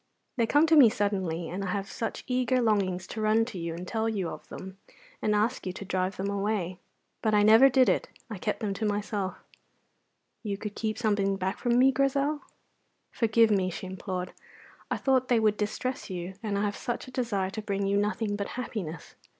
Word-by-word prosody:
They 235 -3 +1
come 290 +6 +5
to 325 0 +4
me 270 -7 +9
suddenly, 190 -6 -1
and 190 +3 -4
I - - -3
have 200 -1 -2
such 225 +2 -4
eager 255 0 +1
longings 195 -6 +1
to 220 - -6
run 215 +1 +3
to 225 -6 -7
you 165 -1 -3
and 180 +2 -7
tell 225 0 0
you 195 -6 -2
of - - -9
them, 190 +1 -9 0.4
and 210 -1 +2
ask 215 +1 0
you 185 - -2
to 200 - -7
drive 185 0 -1
them 195 - -2
away. 200 -3 -1 0.4
But 215 -1 +2
I 205 - +5
never 225 +6 +8
did 260 -1 +4
it; 185 - +1 0.2
I 215 -5 -7
kept 210 - -2
them 205 -3 -1
to 200 - -5
myself." 205 -2 -2 1.1
"You 205 -3 -3
could 210 0 -6
keep 215 0 -2
something 205 -4 +1
back 190 +1 -2
from 240 -1 +2
me, 265 +2 +6
Grizel?" 275 +2 +1 0.7
"Forgive 225 -1 +3
me," 190 -3 +2
she 185 +2 -6
implored; 185 -1 -5 0.6
"I - - 0
thought 260 -2 +2
they 240 -2 +3
would 215 -1 +3
distress 215 +6 -3
you, 180 0 -5
and 210 -3 -2
I 200 - 0
had 205 -1 0
such 240 +4 -4
a - - -10
desire 205 -7 -1
to 215 - -5
bring 200 -1 -2
you 200 +1 +1
nothing 205 +1 0
but 200 -1 -3
happiness. 180 -10 -5
210 Hz, 205 wpm, -28 LUFS, 190-230 Hz, 1.1 s, me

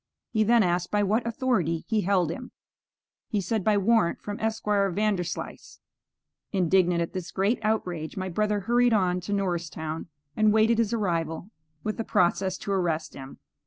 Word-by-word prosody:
He 215 -1 +2
then 230 +1 +4
asked 180 0 0
by 210 0 +1
what 220 +4 +1
authority 220 - 0
he 220 -2 +1
held 180 -4 +1
him. 250 +7 -7 0.8
He 210 - -1
said 215 +1 -1
by 210 +1 +3
warrant 210 -2 +2
from 205 0 -6
Esquire 210 -3 0
Vanderslice. 190 -2 -3 0.7
Indignant 180 -2 +2
at 165 - -7
this 185 -2 -5
great 200 +5 0
outrage, 180 -8 -2
my 185 0 -2
brother 210 +3 0
hurried 240 +4 +3
on 180 -4 +2
to 190 - -6
Norristown, 170 -5 -2 0.3
and 215 -1 +4
waited 220 +2 +3
his 225 -3 +1
arrival 175 -4 -2 0.3
with 215 +1 -3
a - - 0
process 185 -1 +1
to 200 - -5
arrest 170 -5 -1
him. 135 0 -10
200 Hz, 165 wpm, -26 LUFS, 175-215 Hz, 0.8 s, then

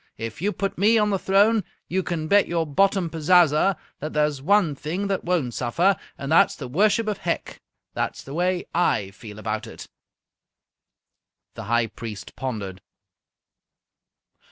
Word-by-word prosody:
If 115 +4 -6
you 205 +3 +1
put 195 -3 -3
me 215 +4 +5
on 210 -1 +2
the 195 - 0
throne, 205 +3 +3 0.2
you 190 +2 0
can 160 -2 -3
bet 205 +4 +4
your 170 -1 0
bottom 190 +4 +2
pazaza 165 +2 +3 0.2
that 155 +2 -5
there's 150 -2 +1
one 190 0 +3
thing 160 +8 -4
that 195 - -1
won't 165 -9 0
suffer, 170 - +2 0.2
and 140 +2 -5
that 165 - +6
is - - -8
the 135 - -7
worship 210 - +2
of 210 -2 -2
Hec!' 170 - -3 0.3
That's - - -3
the 135 - -9
way 180 +2 0
I 105 - +1
feel 105 0 -11
about 110 0 -4
it." - - -10 1.7
The - - -8
High 120 +2 +2
Priest 110 -3 -8
pondered. 100 -8 -5
165 Hz, 155 wpm, -24 LUFS, 130-195 Hz, 1.7 s, that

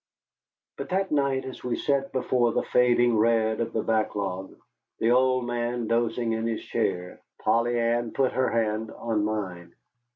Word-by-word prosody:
But - - -6
that 190 +1 0
night, 140 -3 +1
as 130 - -8
we 125 - -1
sat 140 -1 0
before 125 -2 +1
the - - 0
fading 120 -2 +3
red 110 -1 +2
of 115 0 -2
the 110 - -1
backlog, 100 -4 -2 0.4
the 115 - +2
old 130 0 +3
man 120 0 -2
dozing 115 0 0
in 115 0 -1
his 115 -1 -3
chair, 90 0 -2 0.2
Polly 120 +1 +1
Ann 115 0 0
put 135 -2 +1
her 130 0 +1
hand 110 -1 -1
on 110 -2 -2
mine. 95 -5 -4
115 Hz, 160 wpm, -26 LUFS, 110-125 Hz, 0.4 s, fading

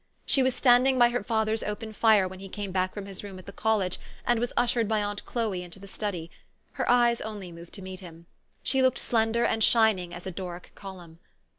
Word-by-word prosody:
She 270 - +2
was 260 -1 +2
standing 255 +1 +5
by 240 -1 +6
her 245 +1 -1
father's 220 0 0
open 215 +1 -5
fire 215 -3 +4
when 185 0 -9
he 195 0 -9
came 200 -1 -5
back 185 0 0
from 205 -2 -7
his 195 0 -7
room 195 -2 -8
at 185 - -12
the 200 - -8
college, 205 -5 0 0.3
and 240 -1 +2
was 240 +1 -1
ushered 240 -2 +2
by 215 -1 +1
aunt 205 0 -4
Chloe 220 -7 -1
into 175 +1 -10
the 195 - -12
study. 185 -5 -4 0.4
Her - - -2
eyes 240 -1 +4
only 205 -5 -6
moved 170 0 -12
to 195 - -8
meet 185 0 -7
him. 170 -3 -12 0.4
She 265 - +2
looked 260 -1 +3
slender 230 0 +1
and 225 0 +1
shining 215 -7 +4
as 175 0 -9
a 190 - -3
Doric 180 -1 -7
column. 180 -4 -11
205 Hz, 225 wpm, -27 LUFS, 185-230 Hz, 0.4 s, by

